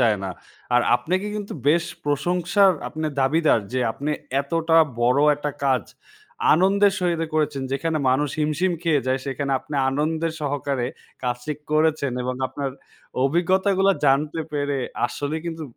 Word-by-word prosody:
যায় 110 -5 +3
না। 95 - -3 0.4
আর, 125 - +6 0.2
আপনাকে 185 +11 -2
কিন্তু 205 -1 -5 0.2
বেশ 170 +2 +3 0.2
প্রশংসার 175 +7 +2 0.2
আপনার 155 -1 -3
দাবিদার 150 -2 +3
যে, 130 - 0
আপনি 145 +2 -3 0.3
এতটা 165 +3 +1 0.3
বড় 125 +4 +4 0.2
একটা 145 0 -3
কাজ, 130 -2 +2 0.7
আনন্দের 195 +3 +4
সহিতে 170 -2 0
করেছেন। 150 -3 0
যেখানে 155 +3 -1
মানুষ 145 +3 +2
হিমশিম 155 +5 +1
খেয়ে 150 -7 +1
যায় 130 0 +1
সেখানে, 140 +1 -2
আপনি 150 - -9 0.2
আনন্দের 160 +3 -1
সহকারে 140 -3 -1 0.4
কাজটি 125 +4 -2 0.2
করেছেন 155 -3 +2
এবং 125 +1 -2
আপনার 140 0 -4 0.5
অভিজ্ঞতাগুলো 190 +5 +2 0.2
জানতে 150 +4 +2
পেরে, 145 -1 -1 0.3
আসলেই 150 +2 -4
কিন্তু 165 -1 -4
150 Hz, 135 wpm, -23 LUFS, 135-165 Hz, 0.7 s, আর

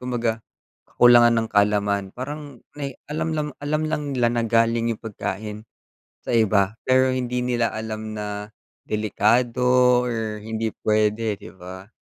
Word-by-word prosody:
kumbaga 120 -3 -2 0.5
kakulangan 120 -1 +6
ng - - -7
kaalaman 100 -1 +2
parang 145 0 -7 0.2
nay 140 -3 -5
alam 155 +2 -2
lang 150 -1 -1
alam 150 +2 -1
lang 155 -1 -1
nila 120 -2 +3
na 120 -1 0
galing 115 0 +2
yung - - -17
pagkain 105 0 -5 0.6
sa - - -3
iba 105 -2 +2
pero 130 0 +4
hindi 125 -1 -2
nila 120 -2 0
alam 110 0 -5
na 105 0 -5 0.4
delikado 110 +4 +1 0.4
or 110 -3 -3
hindi 110 0 -3
puwede 110 0 +1
'di - - -11
ba? 95 +2 -10
115 Hz, 140 wpm, -23 LUFS, 105-125 Hz, 0.6 s, kakulangan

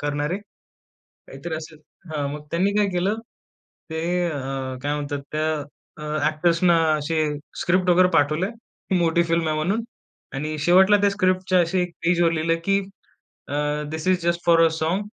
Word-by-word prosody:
करणारे. 145 +3 -1 0.7
काहीतरी 160 +5 -8
असेल. 155 0 -9 0.3
हां, 145 -2 -1
मग 150 0 -8
त्यांनी 185 +4 +1
काय 205 -1 +3
केलं? 200 +5 0 0.7
ते 160 0 -3 0.3
अ, 145 -3 -4 0.4
काय 145 0 0
म्हणतात 145 -1 -3
त्या, 155 +1 0 0.5
अ, 150 0 -3
ॲक्टर्सना 170 +2 +3 0.2
असे 155 +1 0 0.4
स्क्रिप्ट 180 +1 +2
वगैरे 180 +1 +5
पाठवलंय, 155 +6 +2 0.5
मोठी 170 0 +2
फिल्म 165 -1 0
आहे 155 - 0
म्हणून, 195 +9 0 0.5
आणि 155 +3 -3
शेवटला 190 +6 +5
त्या 200 - +4
स्क्रिप्टच्या 185 -2 +1
अशी 175 +2 +1
एक 180 - -3
पेजवर 170 -1 +3
लिहिलं, 165 +1 +1
की 195 0 +3 0.7
अ, 145 - -3 0.4
"this 160 +2 -4
is 185 -1 +2
just 170 0 0
four 165 -1 +5
a - - +6
song. 165 +5 0
165 Hz, 155 wpm, -23 LUFS, 155-185 Hz, 0.7 s, अ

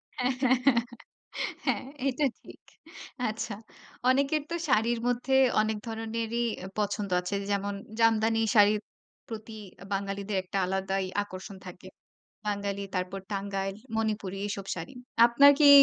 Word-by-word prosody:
হ্যাঁ, 255 +1 +1
হ্যাঁ, 260 0 +5
হ্যাঁ। 240 -4 +5 0.8
হ্যাঁ। - - +1 0.3
এটা 275 +3 +1 0.2
ঠিক। - - -14 0.7
আচ্ছা। 215 -1 -4 0.5
অনেকের 280 +3 +3
তো - - 0
শাড়ির 235 -1 +3
মধ্যে 245 +2 +1 0.3
অনেক 215 0 0
ধরনেরই 225 +1 -2 0.4
পছন্দ 205 -1 -1
আছে। 180 +3 -3 0.2
যেমন 200 0 0 0.3
জামদানি 225 0 +4 0.2
শাড়ির 210 0 +6 0.5
প্রতি 220 0 -7 0.4
বাঙালিদের 195 0 -2
একটা 190 +1 -4
আলাদাই 190 +1 -1 0.2
আকর্ষণ 190 0 -9
থাকে। 180 +1 -10 0.6
বাঙালি 200 -1 -2
তারপর 185 +1 -2
টাঙ্গাইল, 195 -1 -2 0.2
মণিপুরী 210 -3 -1
এসব 200 -1 -4
শাড়ি। 165 +7 -7 0.3
আপনার 280 +4 +7
কি 295 - +8
210 Hz, 120 wpm, -29 LUFS, 195-230 Hz, 0.8 s, কি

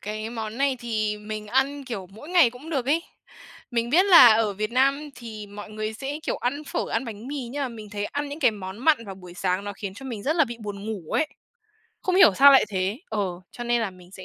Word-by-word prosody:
cái 215 +2 -5
món 225 0 -5
này 275 -1 +2
thì 215 -3 -1
mình 210 0 -6
ăn, 270 +5 0
kiểu, 220 -7 -5
mỗi 220 +10 -12
ngày 345 -9 +5
cũng 255 +7 -11
được 270 -6 -1
ấy. 315 +4 +2 0.7
Mình 235 -1 -1
biết 360 +8 +5
là 350 -9 +10
ở 220 -2 +1
Việt 215 +3 -3
Nam 275 +4 +2
thì 225 -3 -8
mọi 205 +1 -10
người 215 0 -4
sẽ 275 +6 -5
kiểu - - -2
ăn 280 +5 -2
phở, - - -3
ăn - - 0
bánh 225 +1 -8
mì 275 -4 -4
nhưng 285 +3 -3
mà 270 - -1
mình 220 -3 -10
thấy 205 -1 -3
ăn 285 +6 -3
những 290 +3 -7
cái 255 -5 +5
món 190 -2 -8
mặn 270 -2 +3
vào 195 - -6
buổi 180 -2 -12
sáng 185 +1 -1
nó 205 - -4
khiến 195 -1 -7
cho 270 +6 -9
mình 230 -6 -5
rất 305 +8 0
là 320 - +5
bị 240 -2 -7
buồn 205 -2 -6
ngủ 200 -8 -6
ấy. 315 - +2 0.8
Không 370 - 0
hiểu 300 - +7
sao 280 +5 +8
lại 270 - +7
thế, 195 +2 -1
ờ, 220 - -2 0.3
cho 240 - -7
nên 240 0 +1
là 220 -3 -1
mình 180 -1 -17
sẽ 190 -1 -11
230 Hz, 255 wpm, -25 LUFS, 210-275 Hz, 0.8 s, là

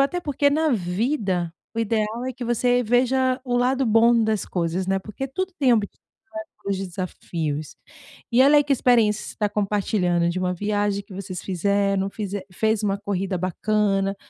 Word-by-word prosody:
Até 315 +6 +1
porque, 285 -2 +1
na 310 +1 +2
vida 190 - -1 0.2
o - - -4
ideal 225 +1 -1
é 260 - -2
que 250 +1 -9
você 245 +1 +2
veja 255 +2 +2
o 245 -1 -2
lado 255 +2 +2
bom 230 +1 +4
das 215 -2 -1
coisas, 175 +1 -2
né, 195 0 +1
porque 215 +7 -6
tudo 375 +7 -3
tem 255 -4 +4
obstáculos, 210 -2 -4 0.6
desafios. 170 -5 -4 0.6
E, 245 - +4
olha, 280 +3 +6
aí, - - +4
que 285 - +1
experiência 230 -5 +3
você - - -8
tá 210 -1 0
compartilhando 195 -4 0
de 175 +2 -2
uma 180 0 -1
viagem 205 +1 -1
que 195 - -16
vocês 185 -2 -6
fizeram, 195 +1 0
fize 200 -1 -4
fez 220 +2 0
uma 200 -1 +1
corrida 195 -2 -2
bacana 195 +2 0
210 Hz, 170 wpm, -23 LUFS, 190-245 Hz, 0.6 s, olha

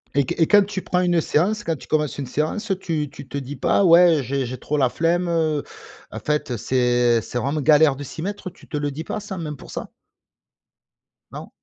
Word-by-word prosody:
Et 140 -1 +3
q - - -3
et 165 - +4
quand 205 -1 +6
tu 195 -1 -5
prends 180 - 0
une 175 -2 +2
séance, 205 +9 0
quand 165 -3 -1
tu - - -13
commences 150 -2 0
une 135 - -4
séance, 155 - -2
tu 155 -5 -2
tu 140 -1 -11
te 135 - -9
dis 140 +1 -6
pas: 145 - +2
«Ouais, 170 -1 +7
heu, - - -1
j'ai 135 +1 -2
j'ai 125 +2 -5
trop 150 - -2
la 130 -3 +3
flemme, 175 +4 0
heu, 160 -3 0 0.5
en - - -6
fait, 150 -4 -1
c'est 120 0 +2
c'est 120 - -4
vraiment 145 +4 -1
galère 150 0 +5
de 145 - -7
s'y 160 - -8
mettre», 200 +1 -4
tu - - -19
te 150 - -4
le 145 0 -2
dis 155 +4 -6
pas 215 - -4
ça, 200 -3 -7
même 150 -3 -5
pour - - -13
ça? - - -6 1.4
Non? - - -8
150 Hz, 230 wpm, -22 LUFS, 140-175 Hz, 1.4 s, Ouais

